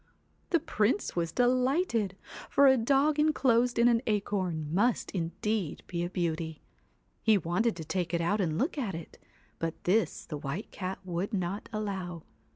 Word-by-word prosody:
The 335 - +3
Prince 225 - 0
was 165 -2 0
delighted, 250 - +1 0.3
for 280 - +5
a 265 -1 +7
dog 275 +5 +2
enclosed 250 -5 +3
in 235 +1 +5
an 235 -1 +4
acorn 185 -7 -1
must 230 +6 +1
indeed 180 +1 -2
be 170 -1 -3
a 175 - -2
beauty. 160 -3 -2 0.6
He 220 -2 +5
wanted 190 +6 0
to 165 -2 -7
take 175 0 -2
it 170 - +1
out 200 +5 +1
and 160 -4 0
look 285 - 0
at 205 -10 -2
it, 165 -1 -9 0.4
but 165 -1 -2
this 210 +5 +1
the 150 - -5
White 145 +9 -5
Cat 185 0 -4
would 185 +5 -2
not 190 +2 -3
allow. 190 -6 -4
200 Hz, 160 wpm, -30 LUFS, 170-240 Hz, 0.6 s, a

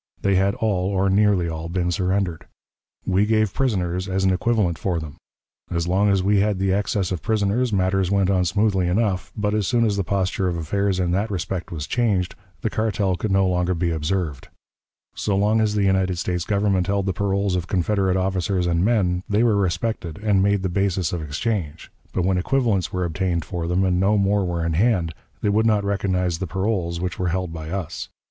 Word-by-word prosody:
They 100 - +3
had 95 +1 +2
all, 95 -4 0
or 95 -1 +1
nearly 100 -3 +3
all, 80 0 -5
been 90 0 -1
surrendered. 90 -1 -1 0.6
We 95 +2 +2
gave 110 -2 +2
prisoners 95 -7 -1
as 95 0 0
an 95 -1 +3
equivalent 95 -4 0
for 90 -4 -1
them. 80 -1 -8 0.5
As 85 -1 -1
long 100 +3 +2
as 95 -2 +2
we 100 +1 +3
had 105 0 +1
the 95 0 +1
excess 100 -1 0
of 90 - -2
prisoners, 110 +3 0
matters 95 -1 +1
went 100 -1 +2
on 90 -2 +2
smoothly 95 0 +1
enough; 95 0 0
but, 105 0 0
as 105 -3 0
soon 120 -2 +2
as 105 -2 0
the 100 - +1
posture 95 0 0
of 85 -1 -1
affairs 95 +4 0
in 90 -1 0
that 100 +5 0
respect 90 -1 -4
was 75 -4 -4
changed, 100 -6 0 0.3
the 110 - 0
cartel 100 -3 0
could 105 +5 -3
no 95 0 +3
longer 90 0 +1
be 85 0 0
observed. 80 -2 -2 0.7
So 100 - -1
long 105 +3 +2
as 105 -1 +1
the 105 - +2
United 95 -2 +1
States 90 0 -2
Government 100 -3 +1
held 100 -1 0
the 95 - 0
paroles 100 -1 0
of 90 -1 -2
Confederate 95 0 +1
officers 95 -1 0
and 85 0 +1
men, 95 -5 +2
they 105 +3 +2
were 115 -3 +3
respected 95 -2 -1
and 100 -3 +3
made 100 0 +2
the - - +1
basis 95 -2 0
of 85 - -2
exchange; 80 +1 -3 0.2
but 90 - -1
when 95 -1 +2
equivalents 115 -3 0
were 90 -1 -1
obtained 85 -1 -1
for 85 -3 -4
them, 90 +2 +1
and 90 -1 +1
no 100 +3 +3
more 100 0 +2
were 85 -2 -2
in 85 - 0
hand, 90 -3 +1 0.3
they 105 - +2
would 110 +2 +2
not 105 -2 +2
recognize 90 -4 0
the 95 - -3
paroles 95 -2 -1
which 90 0 -4
were 90 - 0
held 90 -1 -2
by 80 -1 -6
us. 90 -4 -4
95 Hz, 210 wpm, -22 LUFS, 90-100 Hz, 0.7 s, They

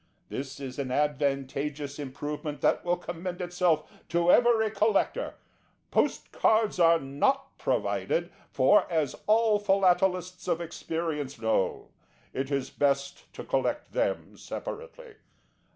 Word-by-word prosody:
This 135 +1 -5
is 135 -1 -6
an 135 -2 -2
advantageous 145 +1 -1
improvement 145 +1 -5
that - - +2
will 175 0 +1
commend 175 +1 -6
itself 175 -3 +1 0.2
to 170 +1 +3
every 230 -3 +4
collector. 215 -1 +1 0.6
Post - - 0
Cards 215 -3 +2
are 165 -1 +6
not 270 - 0
provided - - 0 0.2
for, 205 -3 +4
as 155 -6 +1
all 215 -1 +4
Philatelists 185 -2 +2
of 170 - +1
experience 160 -4 -4
know 110 -4 0 0.4
it 135 +1 -2
is 140 -2 -1
best 140 -1 -1
to - - -6
collect - - -1
them - - -1
separately. 480 -1 -8
170 Hz, 120 wpm, -28 LUFS, 140-195 Hz, 0.6 s, are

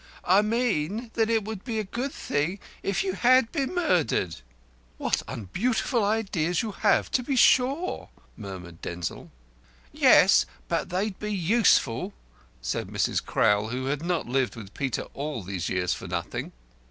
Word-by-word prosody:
"I 190 +3 +5
mean 220 -1 -1
that 225 -1 +1
it 225 -2 +2
would 215 -2 -6
be 230 -4 -3
a 215 - 0
good 240 +7 -4
thing 150 - -2 0.2
if 195 -2 0
you 190 -1 -1
had 250 +3 +4
been 285 +2 -2
murdered." 175 - +1 0.6
"What - - 0
unbeautiful 200 - -1
ideas 195 -5 0
you 220 - -3
have 205 0 +2
to 255 - +2
be 270 +2 -2
sure!" 270 +7 +3 0.3
murmured 90 -5 -9
Denzil. 85 -1 -5 0.6
"Yes; - - +6 0.2
but - - -1
they'd 190 +2 -2
be 210 0 -3
useful," 205 +3 +2 0.5
said - - -2
Mrs. - - 0
Crowl, 105 -1 +2
who 125 +3 -3
had 145 +3 -2
not 175 -1 -1
lived 130 0 0
with 105 -3 -10
Peter 135 -4 -2
all 140 -6 -4
these 90 -2 -3
years 90 -1 0
for - - -7
nothing. - - -4
190 Hz, 155 wpm, -26 LUFS, -, 0.6 s, Yes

